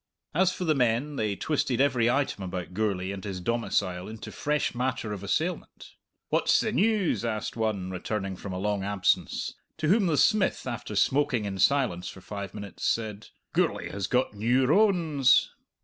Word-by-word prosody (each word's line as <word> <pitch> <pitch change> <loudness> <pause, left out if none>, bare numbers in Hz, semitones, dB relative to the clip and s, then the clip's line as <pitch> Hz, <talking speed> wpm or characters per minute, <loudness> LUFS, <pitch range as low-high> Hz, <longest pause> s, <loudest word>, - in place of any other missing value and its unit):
As 185 +3 +3
for 180 - -5
the 155 - +3
men, 125 +2 +1
they 105 -5 -1
twisted 135 -1 -1
every 125 -4 +3
item 130 -6 0
about 90 -1 -5
Gourlay 95 -2 -1
and 100 -1 -6
his 95 -3 -4
domicile 90 -4 -1
into 110 0 -8
fresh 150 0 -1
matter 125 -3 -2
of 100 - -6
assailment. 160 - -3 0.4
"What's - - +3
the 220 - 0
news?" 210 - +2
asked 110 -2 -3
one, 105 -5 -1
returning 95 +1 -3
from 95 +1 -7
a 90 - -3
long 100 0 -1
absence; 95 -4 0 0.2
to 155 - 0
whom 200 0 +4
the 155 -3 +1
smith, 215 +2 +3
after 120 -4 -5
smoking 125 +1 +2
in 95 -1 -4
silence 125 -7 +2
for - - -10
five 100 +1 -7
minutes, 100 -1 -8
said, 110 -2 -1 0.3
"Gourlay - - 0
has 100 -2 -3
got 125 -2 +1
new 120 +5 +2
rones!" 160 - +4
115 Hz, 170 wpm, -27 LUFS, 100-145 Hz, 0.4 s, whom